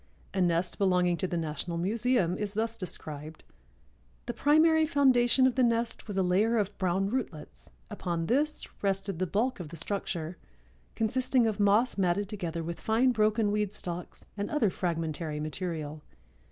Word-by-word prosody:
A 190 - 0
nest 175 0 +1
belonging 180 -3 +3
to 185 - 0
the 175 - -2
National 165 +1 -3
Museum 210 0 +1
is 205 -1 -3
thus 225 +1 -1
described: 155 -5 -6 0.8
"The 240 - -3
primary 315 +5 +4
foundation 260 -3 +4
of 260 - +3
the 260 - +1
nest 230 -1 0
was 205 -2 -4
a 190 - +3
layer 205 +6 +2
of 205 -1 -1
brown 190 +2 0
rootlets; 155 - -5 0.2
upon 170 - -3
this 295 - 0
rested 195 -2 -1
the 185 - 0
bulk 230 +6 0
of 170 -4 -6
the 170 - -9
structure, 170 -1 -3 0.6
consisting 245 +2 +2
of 215 -2 -1
moss 205 +3 +3
matted 190 +2 +1
together 170 -6 -4
with 170 +1 -5
fine 235 +4 +3
broken 215 -1 +2
weed 210 -1 -1
stalks 175 -3 -6
and 205 0 -3
other 255 -10 +2
fragmentary 160 -4 -2
material. 155 -1 -4
195 Hz, 160 wpm, -29 LUFS, 170-230 Hz, 0.8 s, primary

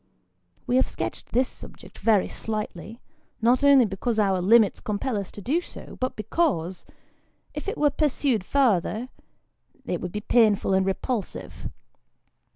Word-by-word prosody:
We 250 0 +2
have 260 - +3
sketched - - -5
this 255 +1 +2
subject - - -13
very 215 -4 +3
slightly, 215 0 -5 0.4
not 245 +4 +3
only 280 -3 +7
because 215 +3 -2
our 195 -3 +2
limits 215 +2 +4
compel 215 +4 -2
us 200 -3 -4
to 205 - -9
do 295 - 0
so, - - -10
but 255 0 -2
because, 215 - -1 0.7
if - - -6
it 405 - -3
were 295 -1 +3
pursued 275 - 0
farther, 235 -1 +1 0.8
it 180 -7 -3
would 180 - -4
be 210 - -3
painful 215 -4 +3
and 190 0 +2
repulsive. 210 +3 -3
225 Hz, 145 wpm, -25 LUFS, 195-255 Hz, 0.8 s, only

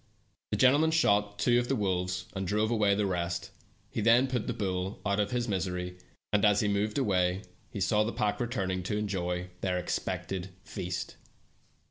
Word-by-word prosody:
The - - -1
gentleman 145 +5 +5
shot 105 -10 +2
two 120 -1 +3
of 120 - -1
the 135 - +1
wolves, 90 -3 -1
and 95 -1 -3
drove 105 +3 +1
away 105 -3 +3
the 105 0 +1
rest; 85 -2 -2 0.4
he - - -2
yien 115 +4 +5
put 125 -4 -2
the - - 0
bull 95 -3 -2
out 100 0 +1
of 100 -1 +1
his 120 +1 -1
misery, 90 -2 -2 0.3
and 105 - +3
as 105 -1 +5
he 105 - +1
mo.t^ed 105 +3 0
away 95 -6 +1 0.3
he - - -6
saw 105 +3 +3
the 110 - -2
pack 105 -2 -1
returning 95 -7 -1
to 105 +3 -2
enjoy 90 -3 -2
their 90 -1 0
expected 90 +1 -3
feast. 90 -2 -5
100 Hz, 180 wpm, -30 LUFS, 90-110 Hz, 0.4 s, gentleman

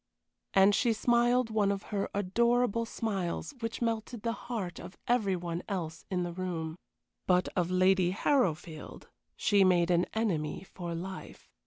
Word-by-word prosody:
And 195 +1 +6
she 235 +2 +3
smiled 240 +1 +2
one 210 -2 +2
of 200 0 -3
her 200 -1 -1
adorable 230 +3 +2
smiles 200 0 -3
which 230 +1 -3
melted 225 0 -2
the 230 - 0
heart 230 -7 -5
of 185 - -10
every 220 -6 +2
one 170 -1 -4
else 165 -5 -4
in 180 -2 0
the 175 -1 -4
room. 170 -3 -3 0.5
But 180 0 +3
of 175 -2 +1
Lady 185 0 +3
Harrowfield 180 - -1 0.3
she 200 -2 +3
made 180 -2 +4
an 175 0 +3
enemy 180 -9 -1
for 175 -2 -6
life. 185 +3 -8
195 Hz, 150 wpm, -30 LUFS, 175-225 Hz, 0.5 s, And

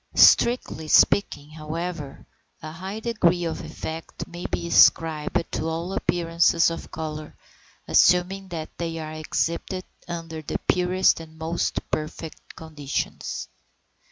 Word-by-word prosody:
Strictly 235 -10 +5
speaking, 150 -3 +3
however, 155 -1 -5 0.3
a 155 - -7
high 190 +6 -6
degree 180 -7 +2
of 165 - -3
effect 160 +1 -6
may 175 +1 -6
be - - -3
ascribed 165 -1 +4
to 160 - -2
all 165 +3 -3
appearances 170 -2 +2
of 165 - -7
colour, 155 -1 -6 0.5
assuming 190 +2 +4
that 165 -3 -6
they 165 -1 -3
are 155 -1 -5
exhibited 170 +3 -2 0.2
under 165 -2 -5
the 155 - -3
purest 180 0 +3
and 160 -1 -12
most 160 +2 -2
perfect 155 +1 -5
conditions. 150 -3 -4
165 Hz, 120 wpm, -25 LUFS, 155-180 Hz, 0.5 s, Strictly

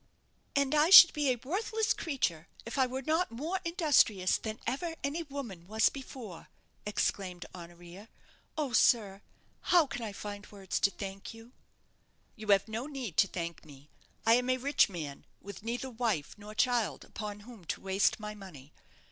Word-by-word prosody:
"And 280 0 +2
I 305 +2 +4
should 355 -2 +11
be 295 -3 +1
a 255 - +2
worthless 440 +5 0
creature 180 - -2 0.2
if 230 +4 -4
I 260 - +4
were 260 +2 -5
not 320 +6 +1
more 315 +11 -3
industrious 290 - +3
than 220 0 -5
ever 325 +5 -2
any 285 +4 -2
woman 265 - -7
was 220 +2 +3
before!" 250 -9 -9 0.4
exclaimed 185 -3 -2
Honoria. 175 +4 -12 0.5
"Oh, 290 -5 -2
sir, 210 -4 +3 0.4
how 345 -3 +4
can 270 -3 -6
I 220 -2 -4
find 205 0 -8
words 195 -3 -4
to - - +4
thank 195 +2 -8
you?" 225 +2 -14 0.8
"You 215 -2 -10
have 200 0 +4
no 225 +5 -4
need 260 - -6
to 195 - +5
thank 170 -2 -5
me. 145 -1 -16 0.3
I 225 - +6
am 250 +1 +2
a 255 - +2
rich 280 -1 +3
man, 155 -7 -7 0.2
with 200 +1 -10
neither 240 +4 -4
wife 220 - -2
nor 210 +1 -11
child 240 -1 +1
upon 210 -1 -7
whom 225 -3 -13
to - - -3
waste 195 +2 +1
my 210 0 -6
money. 165 -9 -13
220 Hz, 170 wpm, -31 LUFS, 195-275 Hz, 0.8 s, should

